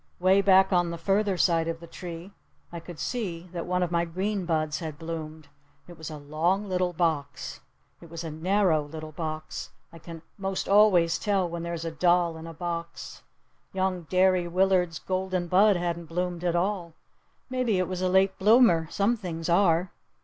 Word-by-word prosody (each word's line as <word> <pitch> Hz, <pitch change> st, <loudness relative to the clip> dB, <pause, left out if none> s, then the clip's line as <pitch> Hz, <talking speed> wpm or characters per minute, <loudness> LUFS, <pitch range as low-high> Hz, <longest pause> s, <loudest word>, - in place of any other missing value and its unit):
'Way 190 Hz, +2 st, +4 dB
back 190 Hz, 0 st, +5 dB
on 175 Hz, -1 st, +2 dB
the 170 Hz, -, -5 dB
further 195 Hz, +2 st, +1 dB
side 165 Hz, -2 st, +2 dB
of 165 Hz, 0 st, -3 dB
the 170 Hz, -, -10 dB
tree 170 Hz, +1 st, -8 dB, 0.4 s
I 170 Hz, -, -6 dB
could 170 Hz, 0 st, -10 dB
see 180 Hz, -5 st, -4 dB
that 170 Hz, -1 st, -4 dB
one 180 Hz, 0 st, +1 dB
of 175 Hz, -, -2 dB
my 170 Hz, -1 st, +2 dB
green 190 Hz, +3 st, -2 dB
buds 155 Hz, -2 st, 0 dB
had 160 Hz, -4 st, -6 dB
bloomed. 160 Hz, -2 st, -7 dB, 0.4 s
It 175 Hz, -, -11 dB
was 160 Hz, -1 st, -8 dB
a 155 Hz, -, -7 dB
long 165 Hz, +8 st, -1 dB
little 180 Hz, -1 st, 0 dB
box. 160 Hz, -4 st, -2 dB, 0.4 s
It 170 Hz, -, -13 dB
was 165 Hz, +1 st, -7 dB
a 165 Hz, -, -5 dB
narrow 175 Hz, 0 st, +2 dB
little 155 Hz, +1 st, -8 dB
box. 155 Hz, -1 st, -5 dB, 0.2 s
I 165 Hz, -, -11 dB
can 165 Hz, 0 st, -10 dB, 0.2 s
most 195 Hz, -1 st, -3 dB
always 190 Hz, -5 st, +4 dB
tell 195 Hz, -4 st, +1 dB
when 170 Hz, 0 st, -5 dB
there's 170 Hz, -1 st, -4 dB
a 165 Hz, -, -3 dB
doll 175 Hz, +1 st, +2 dB
in 160 Hz, +1 st, -9 dB
a -, -, -7 dB
box. 170 Hz, 0 st, -6 dB, 0.5 s
Young 185 Hz, -3 st, -1 dB
Derry 185 Hz, -1 st, +3 dB
Willard's 180 Hz, -1 st, +2 dB
golden 185 Hz, -1 st, -2 dB
bud 195 Hz, +4 st, +5 dB
hadn't 170 Hz, -1 st, -2 dB
bloomed 175 Hz, +1 st, -3 dB
at 175 Hz, -1 st, 0 dB
all. 175 Hz, -2 st, -1 dB, 0.5 s
Maybe 255 Hz, -5 st, 0 dB
it 185 Hz, -1 st, 0 dB
was 185 Hz, -1 st, -4 dB
a 185 Hz, -, +1 dB
late 190 Hz, +1 st, +2 dB
bloomer. 205 Hz, -6 st, +5 dB
Some 205 Hz, +7 st, +1 dB
things 175 Hz, -6 st, -5 dB
are. 175 Hz, 0 st, +3 dB
175 Hz, 185 wpm, -27 LUFS, 165-190 Hz, 0.5 s, back